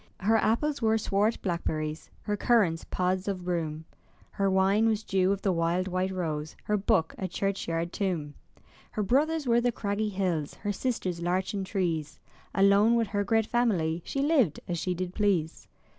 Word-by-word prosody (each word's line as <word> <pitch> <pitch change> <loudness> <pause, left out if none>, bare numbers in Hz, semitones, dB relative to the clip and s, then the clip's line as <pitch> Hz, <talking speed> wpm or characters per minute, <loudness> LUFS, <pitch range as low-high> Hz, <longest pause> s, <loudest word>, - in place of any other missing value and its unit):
Her 220 +3 +4
apples 265 +7 +1
were 220 0 +3
swart 210 +1 +1
blackberries, 160 -4 -3
Her 210 - -1
currants 200 -7 +2
pods 185 +1 -1
o' 200 - 0
broom; 165 -4 -3 0.5
Her 195 -1 0
wine 195 +3 +3
was 220 -1 0
dew 190 -2 +2
of 200 0 -2
the 195 - +2
wild 170 +2 0
white 185 0 -1
rose. 155 -5 -3
Her 210 - 0
book 180 -5 +1
a 190 - -2
churchyard 170 -3 -2
tomb. 170 -7 -2 0.6
Her 215 - -1
brothers 295 +8 +1
were 235 -1 +3
the 245 0 +2
craggy 210 -1 -2
hills, 180 -7 -2
Her 205 - -3
sisters 190 -6 -2
larchen 190 +3 -1
trees; 170 -6 -2 0.4
Alone 200 +4 +5
with 230 -3 +1
her 205 0 0
great 225 +1 +2
family 185 -10 +1
She 275 - -2
lived 275 - +2
as 175 -2 -2
she 180 +1 -1
did 180 0 -4
please. 190 -7 0
195 Hz, 170 wpm, -28 LUFS, 175-215 Hz, 0.6 s, Alone